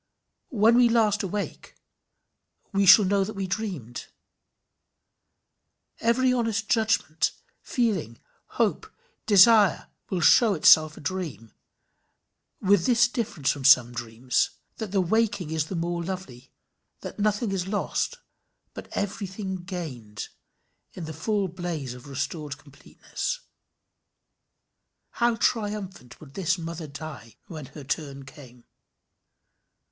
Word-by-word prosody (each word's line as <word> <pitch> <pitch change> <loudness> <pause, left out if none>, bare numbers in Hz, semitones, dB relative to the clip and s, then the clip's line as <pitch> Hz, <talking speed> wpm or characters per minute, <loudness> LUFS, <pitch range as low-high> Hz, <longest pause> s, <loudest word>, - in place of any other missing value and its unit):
When 230 0 +4
we 245 -1 +5
last 215 -3 +2
awake, 200 +1 -5 1.0
we 195 0 +2
shall 195 +2 +9
know 195 +1 +2
that 215 +2 -6
we 195 -1 -3
dreamed. 180 - -5 1.9
Even 230 - 0
every 255 +2 +3
honest 225 -3 -1
judgment, 220 - +1 0.3
feeling, 190 - -1 0.4
hope, - - 0 0.4
desire, 210 -1 +6 0.2
will 185 - -1
show 215 +5 +5
itself 155 0 +5
a - - -10
dream 155 - -5 1.1
with 195 -2 +3
this 240 -1 +4
difference 210 - -1
from 140 - -6
some 125 -3 +6
dreams, 120 +1 -1 0.3
that 220 -4 -5
the 195 -1 +2
waking 200 -3 0
is 160 -2 0
the 185 - -6
more 170 0 -2
lovely, 165 -9 -7 0.5
that - - -8
nothing 210 +1 0
is 190 -1 -2
lost, 210 - -2 0.6
but - - -9
everything 195 -1 -4
gained, 150 - -7 0.6
in 175 - -7
the 160 - -6
full 200 +5 -1
blaze 170 -7 -5
of 125 +2 -12
restored 145 +2 -4
completeness. 150 - -6 1.8
How 235 -1 +3
triumphant 205 - -2
would 140 -3 -14
this 180 0 0
mother 165 -1 -6
die, 140 -6 -9
when 155 -5 -8
her 150 - -11
turn 140 -1 -4
came! 125 -3 -15
185 Hz, 120 wpm, -26 LUFS, 145-210 Hz, 1.9 s, shall